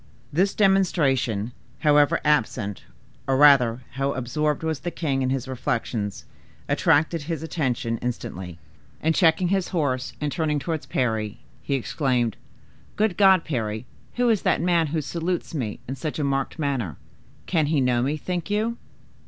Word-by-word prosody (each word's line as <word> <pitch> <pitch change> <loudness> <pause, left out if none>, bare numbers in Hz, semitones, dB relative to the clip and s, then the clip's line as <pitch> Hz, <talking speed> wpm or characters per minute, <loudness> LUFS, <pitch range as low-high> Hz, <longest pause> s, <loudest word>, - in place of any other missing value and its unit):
This 190 +6 +2
demonstration, 140 - +2 0.3
however 150 +1 +4
absent, 110 -8 0 0.4
or 135 -1 +2
rather, 130 -4 +6
however 135 +2 -1
absorbed 150 +5 -1
was 160 -3 -1
the 175 - -3
king 140 -6 -1
in 130 - +1
his 135 -1 -2
reflections, 115 -5 -3 0.4
attracted 160 +2 +2
his 160 +2 -4
attention 125 -8 -1
instantly; 95 -7 -5 0.4
and 160 +1 +1
checking 170 +1 +3
his 190 -1 +1
horse 140 -8 -1
and 150 -1 -2
turning 155 -2 0
towards 155 +2 -3
Parry, 110 -4 -1 0.2
he 140 - -1
exclaimed, 125 -3 0 0.6
"Good 215 -3 +1
God, 190 -3 +5
Parry, 110 -5 -2 0.3
who 245 0 +2
is 220 -4 +2
that - - +2
man 170 -1 +2
who 155 +1 -1
salutes 170 +6 -3
me 120 -9 -3
in 135 - -3
such 150 +3 -4
a 150 - -1
marked 135 +2 -1
manner? 135 - -2 0.5
Can 160 -5 +1
he 150 -1 +2
know 125 -2 +2
me, 140 +5 0
think 175 +4 -4
you?" 220 +3 0
145 Hz, 155 wpm, -24 LUFS, 125-165 Hz, 0.6 s, rather